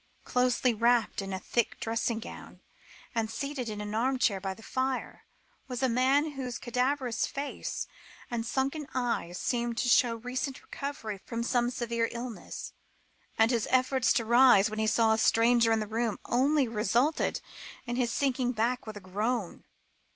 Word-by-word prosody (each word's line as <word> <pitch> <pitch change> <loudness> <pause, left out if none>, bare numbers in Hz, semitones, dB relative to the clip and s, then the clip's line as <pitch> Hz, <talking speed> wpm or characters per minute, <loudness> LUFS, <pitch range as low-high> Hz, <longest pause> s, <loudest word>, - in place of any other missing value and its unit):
Closely 250 0 +2
wrapped 235 -1 +2
in 195 0 -5
a 190 - -2
thick 235 +4 -1
dressing 230 0 -1
gown, 230 - -10 0.5
and 225 -2 0
seated 260 +1 -4
in 210 -1 -5
an 210 0 -5
armchair 235 -4 +1
by 190 -1 -3
the 225 - -15
fire, 260 +2 -3 0.4
was 250 0 -4
a - - +5
man 265 +5 +2
whose 260 -4 -4
cadaverous 250 0 0
face 280 +1 -4 0.5
and 235 -1 -1
sunken 275 +5 -1
eyes 235 -8 -1
seemed 240 -1 -1
to 245 - 0
show 240 -1 +4
recent 255 +3 -4
recovery 225 -8 -5
from 230 0 -3
some 240 0 +1
severe 235 -2 -1
illness; 235 -1 -6 0.6
and 225 +2 +4
his 230 -3 0
efforts 255 0 +3
to 230 - +1
rise, 235 -3 +6
when 215 - -4
he 220 - +1
saw 220 0 +4
a 220 - 0
stranger 230 +1 +4
at 225 - +3
the 215 - -2
door, 225 +1 -1
only 275 +2 +2
resulted 235 +7 +1 0.5
in 240 -1 -3
his 245 -2 0
sinking 255 -3 0
back 235 +2 -1
with 215 -1 -6
a - - -9
groan. 205 +2 -2
240 Hz, 165 wpm, -29 LUFS, 225-255 Hz, 0.6 s, rise